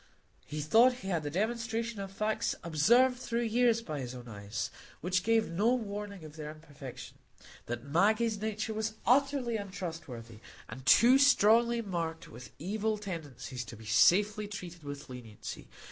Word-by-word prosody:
He 150 0 -4
thought 230 - +5
he - - -3
had 170 -4 0
the 145 - -4
demonstration 225 +4 -2
of 195 -1 -5
facts 215 +2 -1
observed 240 - +4
through 235 -1 -1
years 230 0 +2
by 155 -8 -4
his 125 -1 -5
own 125 -1 -10
eyes, 105 0 -5 0.3
which 185 +3 0
gave 225 -1 +2
no 215 +9 +3
warning 205 -5 -5
of 155 0 -11
their 150 -1 -6
imperfection, 150 -4 -10 0.5
that 120 - -4
Maggie's 210 +8 +2
nature 215 0 -2
was 220 0 -2
utterly 265 -2 +2
untrustworthy, 165 - -7 0.3
and 130 - -9
too 245 - +7
strongly 235 -3 +5
marked 165 -3 -3
with 120 +2 -10
evil 215 +6 -1
tendencies 145 - -6
to 115 0 -10
be 110 - -13
safely 205 - +4
treated 180 -4 -8
with 145 0 -7
leniency. 120 -5 -8
195 Hz, 155 wpm, -31 LUFS, 150-225 Hz, 0.5 s, too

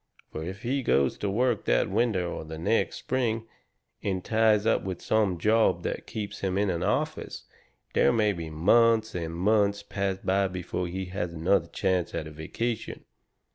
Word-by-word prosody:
Fur 80 - -4
if 95 +4 -6
he 135 +3 0
goes 70 - +2
to 105 - -1
work 120 +2 +1
that - - +2
winter 105 -7 +1
or 85 - -4
the 80 0 -8
next 85 +8 +1
spring, 115 -3 -1 0.6
and 95 -2 -2
ties 110 -1 +3
up 115 - +3
with 95 -2 -5
some 105 -5 +1
job 110 +5 +3
that - - -4
keeps 105 -2 -5
him 95 -1 -1
in 100 -1 +2
an 85 - -2
office, - - -2 0.5
there - - +4
may 105 -3 +2
be 85 -3 -6
months 110 +7 +3
and 85 -2 -4
months 100 +2 +2
pass 100 -1 -2
by 95 +1 +1
before 90 -1 -4
he 95 +2 -4
has 90 -2 -4
another 85 +2 +2
chance 90 0 -1
at 80 - -3
a 80 - -8
vacation. 110 +9 -4
95 Hz, 175 wpm, -27 LUFS, 90-110 Hz, 0.6 s, there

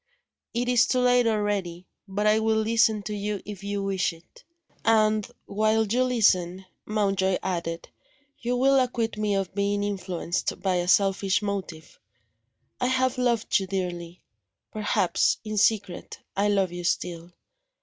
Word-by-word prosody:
"It 245 +1 0
is 245 -2 +4
too 255 - +1
late 245 -1 +4
already. 205 -5 -1 0.2
But 205 +2 -2
I 215 +1 +4
will 220 0 +1
listen 220 -1 +2
to 210 - -5
you 205 0 -3
if 205 -1 -8
you 200 0 -3
wish 190 -3 0
it." 165 +1 -19 0.4
"And, 215 -2 +3 0.2
while 215 +2 +1
you 240 +5 +1
listen," 190 -7 +2 0.2
Mountjoy 195 -3 +1
added, 170 -2 -3 0.5
"you 245 +1 -1
will 270 +2 +4
acquit 240 -3 -1
me 210 -1 0
of 195 -1 -2
being 205 +1 0
influenced 185 -4 -3
by 185 -1 0
a 175 0 -1
selfish 195 +1 +2
motive. 190 -6 -5 0.8
I 250 - +1
have 260 0 +1
loved 235 -4 +1
you 190 - -5
dearly. 180 -2 -4 0.5
Perhaps, 210 -4 +1
in 215 -1 -5
secret, 200 -4 0 0.2
I 200 +1 +2
love 195 -3 +1
you 175 0 -6
still. 170 -1 -2
205 Hz, 150 wpm, -26 LUFS, 185-220 Hz, 0.8 s, is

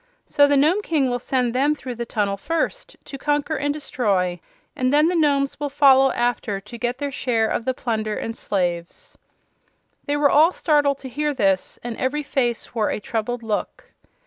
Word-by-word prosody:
So 285 -1 +4
the 285 0 +3
Nome 320 +9 +3
King 290 -9 0
will 245 - -1
send 250 -1 -1
them 285 +4 +2
through 260 -4 -7
the 235 0 -5
tunnel 205 -4 -1
first, - - -3
to 275 - -8
conquer 295 +2 0
and 290 0 -1
destroy, 200 -11 -1 0.4
and 255 0 0
then 300 +3 +4
the 360 - -1
Nomes 280 -4 +1
will 290 -1 -2
follow 270 -1 +5
after 240 -4 -1
to 210 +4 -11
get 245 +1 -2
their 285 +1 -3
share 235 -4 0
of 225 - -2
the 260 - 0
plunder 220 -4 -2
and 225 - -4
slaves." 180 - -3 0.9
They 290 0 0
were 290 -1 +3
all 320 +5 +5
startled 290 -3 +2
to - - -3
hear 295 +3 -2
this, 195 -6 0
and 240 -1 -4
every 295 +4 -1
face 245 -4 -2
wore 220 -3 0
a - - -2
troubled 230 +3 -3
look. 215 -2 -4
260 Hz, 190 wpm, -22 LUFS, 225-290 Hz, 0.9 s, follow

